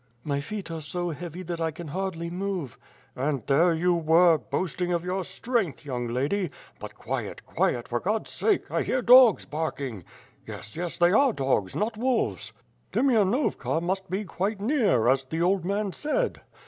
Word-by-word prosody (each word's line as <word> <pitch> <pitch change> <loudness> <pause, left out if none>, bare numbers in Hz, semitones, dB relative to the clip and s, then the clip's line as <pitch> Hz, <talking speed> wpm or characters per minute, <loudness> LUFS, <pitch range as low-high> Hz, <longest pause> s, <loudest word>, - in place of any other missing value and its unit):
"My 140 -2 -1
feet 195 +3 -6
are 165 -1 -4
so 175 +3 -3
heavy 175 +3 -7
that 170 -1 -5
1 160 -1 -1
can 165 0 -8
hardly 170 0 -3
move." 185 - -4 0.4
"And 135 -2 -2
there 165 +6 +4
you 175 +2 +2
were, 165 0 +4
boasting 175 +7 -2
of 170 0 -1
your 185 +1 -1
strength, 220 - -2
young 125 -3 -3
lady. 145 +10 -1 0.3
But - - -8
quiet, - - -5
quiet, 120 - 0
for 120 - -1
God's 215 - -2
sake, 425 -3 0
I - - +1
hear 255 -1 -1
dogs 250 -3 +7
barking! 140 - -4 0.4
Yes, 105 - -8
yes, 175 +1 -3
they 175 0 +4
are 260 +4 +4
dogs, 130 - 0
not 215 +1 -1
wolves. 250 0 0 0.4
Demianovka 235 - +2
must 190 +3 -2
be 195 +3 -2
quite 195 +4 -2
near, 210 - +2
as 135 +1 +3
the 160 +5 -2
old 185 -1 +1
man 200 0 -1
said. 485 +12 -1
175 Hz, 170 wpm, -26 LUFS, 150-200 Hz, 0.4 s, dogs